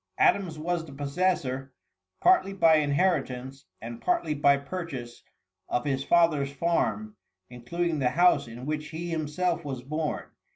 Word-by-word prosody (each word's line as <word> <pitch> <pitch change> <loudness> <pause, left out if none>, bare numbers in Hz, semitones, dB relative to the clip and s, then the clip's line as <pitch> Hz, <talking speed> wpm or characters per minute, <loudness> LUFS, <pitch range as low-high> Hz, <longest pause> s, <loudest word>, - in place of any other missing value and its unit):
Adams 195 - +2
was 170 +2 -2
the 160 - -11
possessor, 140 -2 -1 0.5
partly 350 - +4
by 165 -4 +5
inheritance 140 -4 0
and 115 +1 -8
partly 345 - +1
by 140 -1 +4
purchase, 140 -5 -6 0.5
of 120 - -1
his 135 -1 0
father's 155 -5 +3
farm, 170 +8 -1 0.4
including 160 +7 -2
the 125 -2 +2
house 175 0 +3
in 120 +2 -9
which 150 0 -3
he 170 +2 -5
himself 165 +2 -1
was 135 -4 -5
born. 155 +3 -2
150 Hz, 135 wpm, -27 LUFS, 135-175 Hz, 0.5 s, by